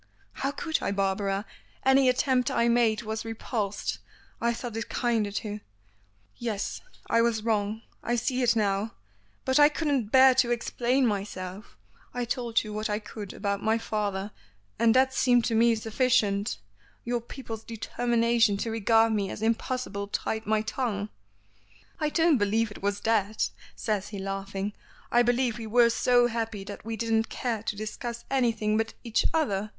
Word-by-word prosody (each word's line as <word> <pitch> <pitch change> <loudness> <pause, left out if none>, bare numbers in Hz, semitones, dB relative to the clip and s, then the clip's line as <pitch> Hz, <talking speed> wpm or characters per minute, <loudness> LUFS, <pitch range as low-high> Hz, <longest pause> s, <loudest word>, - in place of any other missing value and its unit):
"How 275 - -2
could 315 +3 -2
I, - - -1
Barbara? 195 +1 0 0.4
Any 265 0 +5
attempt 255 0 +2
I 235 - +2
made 235 -2 +3
was 220 0 -3
repulsed. 225 -2 -3 0.4
I 235 - +2
thought 235 -1 -5
it 225 +1 -4
kinder 230 -4 0
to 210 0 -4 0.4
" 100 0 -38
"Yes 205 -2 -3 0.3
I 230 - +3
was 230 -2 +1
wrong. 215 0 0 0.2
I 240 - 0
see 255 +2 0
it 235 -2 +3
now. 205 0 0 0.5
But 260 +2 +3
I 290 0 +8
couldn't 290 -7 0
bear 260 +3 +7
to 250 -1 +3
explain 240 +2 +1
myself. 195 -2 -4 0.4
I 245 -1 -1
told 235 -2 0
you 215 -1 -7
what 215 +1 -2
I 210 - 0
could 210 -2 -8
about 200 -1 -2
my 220 +1 +2
father, 205 -3 -2 0.5
and 230 0 +4
that 260 0 +4
seemed 245 -3 +3
to 230 - 0
me 230 +1 +4
sufficient. 220 - +1 0.5
Your 240 0 -1
people's 225 -2 -8
determination 230 -1 +1
to 225 +3 -2
regard 225 +1 +3
me 200 -2 0
as 215 - -6
impossible 225 -2 -1
tied 220 +2 -3
my 215 0 +2
tongue." 220 -3 -2 0.9
"I 305 - +1
don't 325 -3 +3
believe 210 +2 +1
it - - -10
was 200 +1 -1
that," 215 -1 +1 0.2
says 210 -3 -2
he 205 - -7
laughing. 195 +1 -4 0.4
"I 240 - +5
believe 245 -1 +1
we 225 - -5
were 235 +1 +5
so 245 +1 +4
happy 225 -3 -2
that 205 +1 -8
we 225 +1 -4
didn't 225 0 +1
care 235 -4 -2
to 215 - -3
discuss 230 +3 -5
anything 225 -5 +1
but 225 0 -1
each 230 -2 +1
other. 215 -10 0
225 Hz, 165 wpm, -27 LUFS, 205-240 Hz, 0.9 s, I